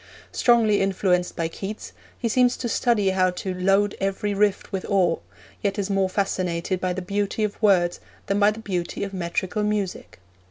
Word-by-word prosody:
Strongly 225 Hz, -4 st, +3 dB
influenced 185 Hz, -2 st, +1 dB
by 165 Hz, -, -1 dB
Keats, 195 Hz, +5 st, -7 dB, 0.2 s
he 235 Hz, -, -1 dB
seems 245 Hz, +2 st, +3 dB
to 245 Hz, -, -3 dB
study 220 Hz, -4 st, +2 dB
how 185 Hz, -1 st, +3 dB
to 185 Hz, +1 st, -4 dB
'load 195 Hz, +3 st, +2 dB
every 195 Hz, +1 st, -1 dB
rift 205 Hz, 0 st, +1 dB
with 190 Hz, -1 st, -3 dB
ore,' 180 Hz, -4 st, +2 dB, 0.4 s
yet 200 Hz, 0 st, -1 dB
is 200 Hz, 0 st, -2 dB
more 195 Hz, -1 st, +2 dB
fascinated 185 Hz, -2 st, -1 dB
by 185 Hz, -, 0 dB
the 185 Hz, +1 st, -4 dB
beauty 200 Hz, +3 st, -1 dB
of 210 Hz, +1 st, -3 dB
words 180 Hz, -5 st, +3 dB, 0.3 s
than 200 Hz, +1 st, 0 dB
by 205 Hz, 0 st, +6 dB
the 215 Hz, -, -4 dB
beauty 180 Hz, -4 st, -3 dB
of 200 Hz, 0 st, -5 dB
metrical 185 Hz, +2 st, -2 dB
music. 210 Hz, -, -2 dB
195 Hz, 175 wpm, -24 LUFS, 185-210 Hz, 0.4 s, by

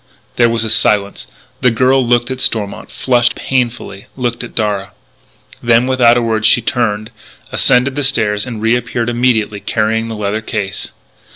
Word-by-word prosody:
There 120 Hz, -1 st, +4 dB
was 115 Hz, -1 st, 0 dB
a 110 Hz, -, -2 dB
silence. 100 Hz, -2 st, +1 dB, 0.3 s
The 125 Hz, -, +4 dB
girl 130 Hz, +3 st, +2 dB
looked 120 Hz, +1 st, +1 dB
at 130 Hz, 0 st, -4 dB
Stormont, 105 Hz, -3 st, -2 dB
flushed 120 Hz, -2 st, +1 dB
painfully, 120 Hz, -6 st, -3 dB
looked 120 Hz, -2 st, -2 dB
at 120 Hz, -, -10 dB
Darragh. 105 Hz, -3 st, -1 dB, 0.7 s
Then, 115 Hz, +1 st, +3 dB
without 125 Hz, -2 st, +4 dB
a 120 Hz, -, +1 dB
word, 110 Hz, -1 st, -1 dB
she 120 Hz, -, +5 dB
turned, 110 Hz, -2 st, -2 dB, 0.4 s
ascended 130 Hz, +2 st, +2 dB
the 145 Hz, -, -1 dB
stairs, 110 Hz, -5 st, 0 dB
and 110 Hz, -3 st, -6 dB
reappeared 115 Hz, 0 st, 0 dB
immediately 120 Hz, -4 st, 0 dB
carrying 110 Hz, +2 st, -1 dB
the 115 Hz, -, -5 dB
leather 105 Hz, +1 st, -2 dB
case. 105 Hz, -4 st, -4 dB
115 Hz, 160 wpm, -15 LUFS, 110-125 Hz, 0.7 s, she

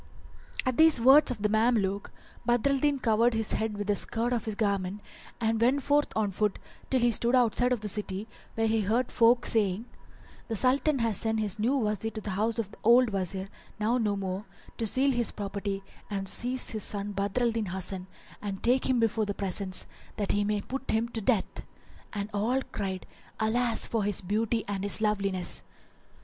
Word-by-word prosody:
[FN#395] -, -, -7 dB
At 255 Hz, -, -3 dB
these 320 Hz, -4 st, +6 dB
words 270 Hz, +5 st, +7 dB
of 240 Hz, -5 st, -4 dB
the 210 Hz, -, +2 dB
Mameluke, 215 Hz, -3 st, +1 dB, 0.3 s
Badr 240 Hz, +3 st, +2 dB
al 275 Hz, -, +1 dB
Din 290 Hz, 0 st, +2 dB
covered 230 Hz, -1 st, +2 dB
his 220 Hz, -1 st, 0 dB
head 220 Hz, -1 st, -1 dB
with 205 Hz, -, -3 dB
the 205 Hz, 0 st, +1 dB
skirt 235 Hz, +4 st, -1 dB
of 235 Hz, -, -1 dB
his 220 Hz, -2 st, -3 dB
garment 200 Hz, -2 st, -1 dB, 0.4 s
and 225 Hz, -1 st, 0 dB
went 260 Hz, +4 st, +3 dB
forth 290 Hz, +1 st, +3 dB
on 215 Hz, -2 st, +1 dB
foot 210 Hz, +1 st, 0 dB, 0.3 s
till 260 Hz, -2 st, +2 dB
he 240 Hz, 0 st, +4 dB
stood 235 Hz, +3 st, +3 dB
outside 245 Hz, 0 st, +3 dB
of 245 Hz, -4 st, 0 dB
the 215 Hz, -, -3 dB
city, 205 Hz, 0 st, -2 dB, 0.3 s
where 225 Hz, -, +1 dB
he 220 Hz, 0 st, +2 dB
heard 230 Hz, +5 st, 0 dB
folk 240 Hz, +1 st, +4 dB
saying, 210 Hz, -1 st, +2 dB, 0.6 s
"The 225 Hz, -, -2 dB
Sultan 270 Hz, +6 st, +2 dB
hath 230 Hz, -5 st, +1 dB
sent 220 Hz, 0 st, 0 dB
his 210 Hz, -1 st, -2 dB
new 245 Hz, +6 st, +2 dB
Wazir 215 Hz, -2 st, -1 dB
to 215 Hz, -, -4 dB
the 205 Hz, -, -5 dB
house 215 Hz, +4 st, 0 dB
of 215 Hz, -3 st, -3 dB
the -, -, -15 dB
old 240 Hz, +1 st, +5 dB
Wazir, 190 Hz, 0 st, -3 dB, 0.3 s
now 230 Hz, +4 st, +1 dB
no 210 Hz, -3 st, +1 dB
more, 195 Hz, +1 st, -4 dB, 0.3 s
to 225 Hz, -, +1 dB
seal 270 Hz, +5 st, +2 dB
his 240 Hz, -3 st, +1 dB
property 200 Hz, -1 st, -4 dB, 0.3 s
and 195 Hz, -2 st, -3 dB
seize 250 Hz, +6 st, 0 dB
his 215 Hz, -3 st, -3 dB
son 205 Hz, 0 st, -4 dB
Badr 200 Hz, +4 st, -1 dB
al 235 Hz, -, +3 dB
Din 225 Hz, -2 st, -2 dB
Hasan 185 Hz, 0 st, -3 dB, 0.3 s
and 195 Hz, -2 st, -5 dB
take 255 Hz, +2 st, +2 dB
him 255 Hz, -2 st, +3 dB
before 225 Hz, -1 st, +1 dB
the 205 Hz, -, -3 dB
presence, 190 Hz, -1 st, -2 dB, 0.3 s
that 205 Hz, -, -1 dB
he 205 Hz, -, +2 dB
may 210 Hz, 0 st, 0 dB
put 270 Hz, +4 st, -6 dB
him 225 Hz, +2 st, +1 dB
to 225 Hz, -1 st, -4 dB
death; 215 Hz, -1 st, 0 dB, 0.2 s
" -, -, -25 dB
and 200 Hz, -2 st, -3 dB
all 240 Hz, +6 st, 0 dB
cried, 190 Hz, -3 st, -4 dB, 0.3 s
"Alas 230 Hz, +1 st, +1 dB
for 225 Hz, -2 st, -1 dB
his 205 Hz, -1 st, -1 dB
beauty 220 Hz, +4 st, -1 dB
and 200 Hz, -1 st, -3 dB
his 205 Hz, -, +4 dB
loveliness!" 195 Hz, -4 st, +1 dB
220 Hz, 205 wpm, -28 LUFS, 200-240 Hz, 0.6 s, words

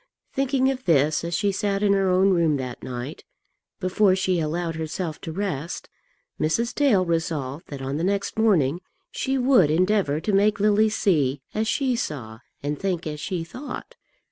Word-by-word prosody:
Thinking 270 Hz, -1 st, +2 dB
of 260 Hz, -1 st, -6 dB
this 155 Hz, -2 st, +3 dB
as 170 Hz, 0 st, -2 dB
she 205 Hz, +1 st, +1 dB
sat 200 Hz, 0 st, -1 dB
in 200 Hz, -1 st, +4 dB
her 195 Hz, -1 st, +2 dB
own 190 Hz, +2 st, +4 dB
room 165 Hz, -5 st, +3 dB
that 125 Hz, -2 st, -6 dB
night, 125 Hz, +4 st, -6 dB, 0.6 s
before 185 Hz, 0 st, +3 dB
she 190 Hz, -2 st, +1 dB
allowed 165 Hz, +2 st, -2 dB
herself 160 Hz, +1 st, -4 dB
to 160 Hz, -, -5 dB
rest, 170 Hz, -3 st, -4 dB, 0.5 s
Mrs. 230 Hz, +10 st, 0 dB
Dale 230 Hz, -11 st, +3 dB
resolved 160 Hz, -4 st, -2 dB
that 140 Hz, -2 st, -7 dB
on 135 Hz, +2 st, -2 dB
the 165 Hz, -, -2 dB
next 195 Hz, +1 st, -1 dB
morning 175 Hz, -8 st, +3 dB, 0.3 s
she 270 Hz, 0 st, -1 dB
would 250 Hz, -, +4 dB
endeavour 180 Hz, -2 st, +2 dB
to 205 Hz, +5 st, -2 dB
make 205 Hz, +1 st, +3 dB
Lily 210 Hz, +1 st, +4 dB
see 145 Hz, -, +1 dB
as 220 Hz, +1 st, -1 dB
she 260 Hz, +1 st, +1 dB
saw 125 Hz, -, -5 dB, 0.2 s
and 145 Hz, 0 st, -2 dB
think 180 Hz, -3 st, -2 dB
as 150 Hz, -1 st, -4 dB
she 180 Hz, 0 st, -3 dB
thought. 265 Hz, -, -8 dB
180 Hz, 170 wpm, -24 LUFS, 155-210 Hz, 0.6 s, in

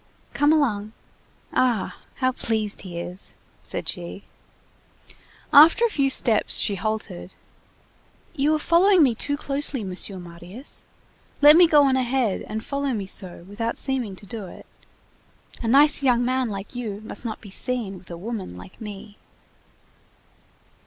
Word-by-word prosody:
"Come 290 Hz, +1 st, +3 dB
along. 220 Hz, -9 st, +1 dB, 0.6 s
Ah! 240 Hz, -6 st, 0 dB, 0.2 s
how 255 Hz, -1 st, +1 dB
pleased 220 Hz, -4 st, -2 dB
he 180 Hz, -3 st, -8 dB
is!" 180 Hz, +3 st, -7 dB, 0.3 s
said -, -, -6 dB
she. 175 Hz, +2 st, -5 dB, 1.3 s
After 325 Hz, +11 st, +8 dB
a -, -, +1 dB
few 275 Hz, -6 st, +1 dB
steps 230 Hz, -4 st, +3 dB
she 205 Hz, -, +3 dB
halted. 200 Hz, -3 st, -4 dB, 1.0 s
"You 300 Hz, 0 st, +2 dB
are -, -, +1 dB
following 345 Hz, +3 st, +4 dB
me 255 Hz, -4 st, +3 dB
too 285 Hz, +5 st, -3 dB
closely, 280 Hz, -3 st, -1 dB
Monsieur 190 Hz, +1 st, -3 dB
Marius. 175 Hz, -, -11 dB, 0.5 s
Let 295 Hz, +1 st, +8 dB
me 350 Hz, 0 st, +7 dB
go 295 Hz, -2 st, +5 dB
on 265 Hz, -1 st, +3 dB
ahead, 250 Hz, -4 st, 0 dB
and 220 Hz, +1 st, -5 dB
follow 280 Hz, -1 st, -2 dB
me 205 Hz, -4 st, -3 dB
so, 185 Hz, -2 st, -4 dB
without 230 Hz, +3 st, -3 dB
seeming 255 Hz, -8 st, -2 dB
to 200 Hz, -, -11 dB
do 215 Hz, -2 st, -7 dB
it. -, -, -13 dB, 1.0 s
A 230 Hz, -, -3 dB
nice 285 Hz, +5 st, +5 dB
young 245 Hz, -3 st, +2 dB
man 255 Hz, -1 st, 0 dB
like 195 Hz, 0 st, -7 dB
you 220 Hz, -5 st, -5 dB
must 220 Hz, -, -5 dB
not 220 Hz, -3 st, -5 dB
be 200 Hz, -, -13 dB
seen 225 Hz, -4 st, -2 dB
with -, -, -20 dB
a 170 Hz, -, -7 dB
woman 195 Hz, -, -6 dB
like 90 Hz, -, -13 dB
me." 210 Hz, 0 st, -9 dB
230 Hz, 150 wpm, -24 LUFS, 200-275 Hz, 1.3 s, After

